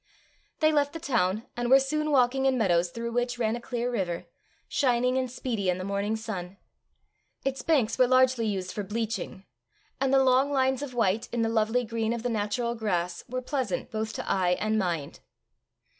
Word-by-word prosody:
They 310 0 +5
left 290 -1 +1
the 330 - -5
town, 225 - 0
and 240 0 -2
were 270 +1 +8
soon 305 +3 -1
walking 265 -1 +3
in 260 -1 +2
meadows 175 -6 +2
through 235 +5 -5
which 245 +1 -1
ran 225 -1 0
a 240 - -6
clear 245 0 -2
river, 180 -7 -2 0.4
shining 250 -2 +2
and 260 -1 0
speedy 230 -6 -2
in 180 - +1
the 185 - -5
morning 200 +2 -1
sun. 200 -4 -6 0.9
Its 270 0 -1
banks 265 -8 +1
were 255 - +6
largely 255 -2 +3
used 190 -3 -2
for 210 - -4
bleaching, 210 -2 -4 0.5
and 270 0 +1
the 270 0 +5
long 265 +2 +3
lines 265 -1 +1
of 270 -4 -6
white 225 0 +1
in 235 -1 0
the 225 - +1
lovely 225 +2 +1
green 225 0 -1
of 235 -1 -4
the 245 - 0
natural 230 +2 -1
grass 180 -6 -2
were 255 +1 -3
pleasant 260 -1 -2
both 220 0 -2
to - - -5
eye 180 -2 +2
and 215 0 +1
mind. 170 -7 -2
235 Hz, 190 wpm, -27 LUFS, 205-255 Hz, 0.9 s, were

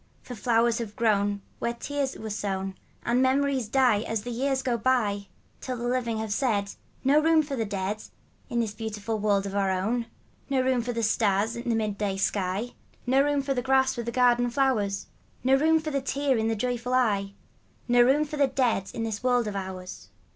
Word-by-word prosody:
For 250 - -8
flowers 230 +1 +2
have 215 -3 -5
grown 205 -3 +1 0.2
Where 235 0 -1
tears 280 +2 -3
were 220 -1 -6
sown, 195 -2 -3 0.3
And 240 +2 +2
memories 265 -2 +2
die 245 -2 +3
As 220 -1 -3
the 245 - -5
years 265 +2 0
go 250 -2 +1
by. 215 -5 +1 0.3
Till 255 -1 -4
the 240 +1 -3
living 245 -2 0
have 220 -1 -2
said, 205 -5 0
" - - -35
No 280 +3 +5
room 320 0 +4
for 285 -2 -4
the 225 -3 -1
dead 200 +1 -3 0.5
In 235 0 0
this 220 -3 -2
beautiful 220 0 -4
world 200 -1 +1
of 195 - -5
our 200 -1 +1
own; 220 +6 -1 0.4
No 270 -2 +2
room 255 -1 +2
for 245 +1 -3
the 230 -1 -2
stars 215 0 +1
in 235 0 -3
a - - +2
mid 215 -2 -2
day 200 -2 -1
sky, 195 +4 -1 0.3
No 260 +2 +4
room 285 0 +1
for 275 0 0
the 250 - -1
grass 265 0 +2
with 235 -2 -5
the - - -1
garden 245 0 +3
flowers; 235 -7 0 0.4
No 260 +1 +3
room 320 +4 +4
for 310 -1 -4
the 275 -1 0
tears 275 -1 0
in 220 - 0
a 225 - 0
joyful 245 +2 -1
eye, 200 -6 +1 0.5
No 245 0 +5
room 275 +5 +4
for 300 0 -6
the 280 -1 +4
dead 245 -7 0
in 230 - -2
this 220 -2 -3
world 245 -1 +2
of 210 -1 -4
ours." 185 - -6
235 Hz, 210 wpm, -27 LUFS, 205-260 Hz, 0.5 s, No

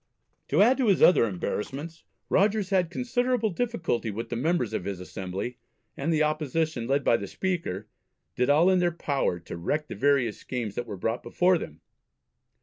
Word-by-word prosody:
To 160 +8 +4
add 250 +4 +4
to 260 -4 +1
his 195 -4 +4
other 180 - +7
embarrassments 135 - -4 0.2
Rogers 205 0 +2
had 185 -3 +2
considerable 245 0 0
difficulty 175 - -1
with 115 +3 -5
the 120 - -3
members 130 - 0
of 110 - -2
his 100 -2 -4
Assembly, 95 +6 -5 0.4
and 150 +4 -1
the 155 -1 +3
opposition, 155 -4 -1
led 140 +2 +1
by 115 - +4
the 100 - -6
Speaker, 160 - -3 0.5
did 125 +2 +1
all 160 +6 +5
in 185 - +3
their 175 -1 +2
power 140 - -1
to - - -8
wreck 150 - -2
the - - -5
various 135 -5 +2
schemes 120 -6 -4
that 120 - -4
were 105 -3 -6
brought 115 +6 -2
before 180 -1 +2
them. 80 - -9
145 Hz, 180 wpm, -27 LUFS, 115-180 Hz, 0.5 s, other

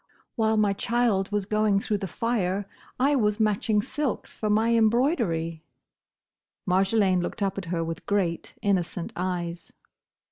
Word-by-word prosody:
"While 220 -2 +2
my 210 -2 +3
child 220 -2 0
was 205 -1 0
going 215 -1 +2
through 205 0 -1
the 195 - -3
fire, 200 -3 -1 0.3
I 280 +3 +3
was 210 -4 +1
matching 210 0 +2
silks 295 -1 -3
for 215 - -2
my 220 +3 +3
embroidery!" 220 - +1 1.0
Marjolaine 190 0 +3
looked 190 - -3
up 195 0 -1
at 195 - -7
her 165 -1 -1
with 165 0 -6
great, 185 -5 -1
innocent 185 -4 -1
eyes. 175 -2 -3
205 Hz, 140 wpm, -26 LUFS, 185-220 Hz, 1.0 s, my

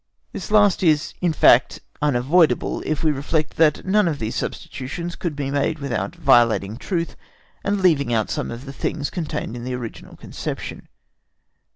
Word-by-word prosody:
This - - -6
last 205 -3 +4
is, 155 -5 +2
in 175 -2 +2
fact, 130 -4 +4 0.2
unavoidable, 150 +4 +2
if 155 0 -1
we 155 - +4
reflect 150 +2 -2
that 155 -2 +3
none 200 0 +3
of 155 -3 -1
these 110 -4 -4
substitutions 170 +7 -5
could 170 -5 -4
be 140 -1 -3
made 145 +3 0
without 140 +3 -3
violating 120 - +3
truth 170 +3 -3 0.5
and 200 -1 0
leaving 140 -8 +3
out 110 -2 0
some - - -2
of 120 +3 -7
the 135 - -8
things 145 +1 -3
contained 150 - -4
in 120 - -7
the 125 0 -3
original 120 -3 -8
conception. - - -6
150 Hz, 165 wpm, -22 LUFS, 130-170 Hz, 0.5 s, last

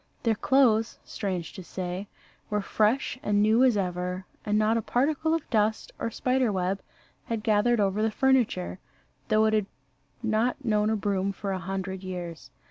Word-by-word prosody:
Their 230 - +3
clothes, 225 -2 +3
strange 185 -5 -4
to 190 - -8
say, 185 +2 -5 0.4
were 210 -1 0
fresh 225 +6 +1
and 205 0 +1
new 220 +4 +4
as 250 -5 +4
ever: 180 0 -2 0.2
and 210 0 +1
not 215 +1 +3
a 230 - +1
particle 310 +8 +1
of 325 - -4
dust 215 -1 +1
or - - -1
spider 255 +1 +1
web 190 0 -1 0.4
had 225 -2 -3
gathered 220 +2 +3
over 200 +1 +1
the 220 - +2
furniture, 225 - +1 0.5
though 215 0 +4
it 220 - +2
had 210 -2 +2 0.6
not 230 +4 0
known 210 -1 +2
a 220 - +2
broom 200 -1 0
for 195 0 -4
a 190 - -2
hundred 190 +1 -4
years. 175 -3 -6
210 Hz, 170 wpm, -27 LUFS, 190-230 Hz, 0.6 s, new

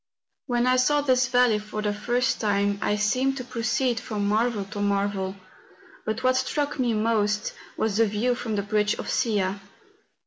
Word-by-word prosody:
When 240 -1 +1
I 255 0 +3
saw 290 +3 +3
this 255 -3 +2
valley 245 -3 +3
for 215 0 -6
the 210 -1 0
first 240 +4 0
time 200 -1 +1
I 210 - +1
seemed 255 +6 +1
to 255 - -4
proceed 240 0 -1
from 210 -5 -3
marvel 215 0 +1
to 205 +1 -7
marvel; 200 -1 0 0.7
but 220 +4 -2
what 255 0 +3
struck 285 +2 -1
me 240 -3 +1
most, 215 -1 0 0.2
was 215 -2 0
the 225 -1 +4
view 215 +5 0
from 235 -3 -3
the 200 - -1
bridge 210 +1 +1
of - - -5
Sia. 200 -3 0
220 Hz, 175 wpm, -25 LUFS, 205-250 Hz, 0.7 s, the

